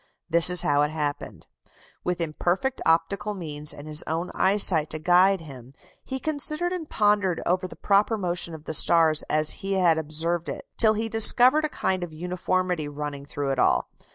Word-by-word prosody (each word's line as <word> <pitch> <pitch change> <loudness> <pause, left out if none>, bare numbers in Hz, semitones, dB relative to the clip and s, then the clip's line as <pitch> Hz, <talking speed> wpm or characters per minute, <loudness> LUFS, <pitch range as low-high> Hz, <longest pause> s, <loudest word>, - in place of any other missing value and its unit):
This 170 +1 +7
is 180 -2 +3
how 145 0 +1
it 150 - 0
happened. 150 -2 -5 0.6
With 180 0 -3
imperfect 175 +10 -2
optical 200 +6 0
means 150 -4 -5
and 145 +1 -8
his 155 0 +2
own 165 +3 -4
eyesight 190 -5 +3
to 155 - -3
guide 180 +3 +2
him, 135 -4 -13 0.3
he 265 0 -6
considered 310 +4 -2
and 330 -4 -7
pondered 205 -4 0
over 185 +1 -1
the - - -13
proper 205 +3 +1
motion 175 -3 -2
of 155 -1 -14
the - - -5
stars 160 0 +4
as 155 0 +4
he 195 0 -3
had 175 -4 +2
observed 160 +2 -4
it, - - -7
till 220 -2 +3
he 225 +1 -3
discovered 245 +7 +4
a - - -3
kind 185 -9 -3
of 175 - -7
uniformity 180 -1 -3
running 145 -1 -7
through 140 -1 -4
it 135 - -3
all. - - +1
175 Hz, 180 wpm, -24 LUFS, 155-200 Hz, 0.6 s, This